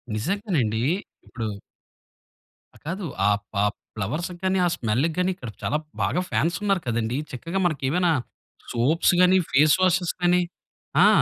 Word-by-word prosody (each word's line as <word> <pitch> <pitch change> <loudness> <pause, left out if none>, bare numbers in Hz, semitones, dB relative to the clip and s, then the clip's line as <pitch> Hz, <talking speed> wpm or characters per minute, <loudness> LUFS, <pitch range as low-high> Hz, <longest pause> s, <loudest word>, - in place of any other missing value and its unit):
నిజంగనండి. 135 - 0 0.4
ఇప్పుడు 115 -2 -4 1.3
ఆ! - - -15
కాదు. 185 +4 -3 0.2
ఆహ్, 105 0 +3 0.2
పాప్ 105 +1 +1 0.2
ఫ్లవర్స్‌కి 155 - -3
గాని, 190 0 +2
ఆ - - +4
స్మెల్‌కి 125 +8 0
గాని, 180 +1 +2
ఇక్కడ 125 -9 -8
చాలా 150 - +1 0.3
బాగా 180 - +1
ఫ్యాన్స్ 170 +1 +1
ఉన్నారు 195 -3 +2
కదండీ. 115 +2 -1
చక్కగా 165 +9 -3
మనకు 155 -6 0
ఏమైనా 175 +3 +2 0.6
సోప్స్ 145 +10 +3
గాని, 180 +1 +6
ఫేస్ 150 +2 +5
వాషెస్ 180 -1 +2
గాని. 180 0 +4 0.6
ఆ! - - +8
165 Hz, 140 wpm, -24 LUFS, 115-180 Hz, 1.3 s, ఆ